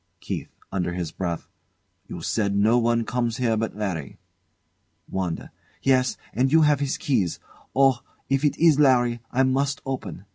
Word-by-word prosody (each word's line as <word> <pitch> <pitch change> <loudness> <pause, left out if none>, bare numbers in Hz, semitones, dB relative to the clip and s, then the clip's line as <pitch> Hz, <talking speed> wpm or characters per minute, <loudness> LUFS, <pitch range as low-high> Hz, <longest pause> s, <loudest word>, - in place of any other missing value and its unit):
KEITH. - - -5 0.2
[Under 90 -3 -1
his 85 -3 -3
breath] 85 -1 -4 0.6
You - - -7
said 100 -3 0
no 110 +4 +4
one 115 0 +1
comes 120 -1 -1
but 115 -3 0
Larry. 90 -10 -4 0.9
WANDA. 90 -3 -3 0.3
Yes, 130 -2 +3 0.2
and 130 +3 +1
you 160 +1 +6
have 150 -2 +4
his 140 -1 -1
keys. 105 - 0 0.4
Oh! 135 -2 +4 0.3
if 135 +1 +1
it 145 -1 +2
is 160 -3 +5
Larry! 120 -4 +4
I 130 +2 +3
must 135 +1 +1
open! 105 -9 -5
120 Hz, 150 wpm, -24 LUFS, 100-135 Hz, 0.9 s, you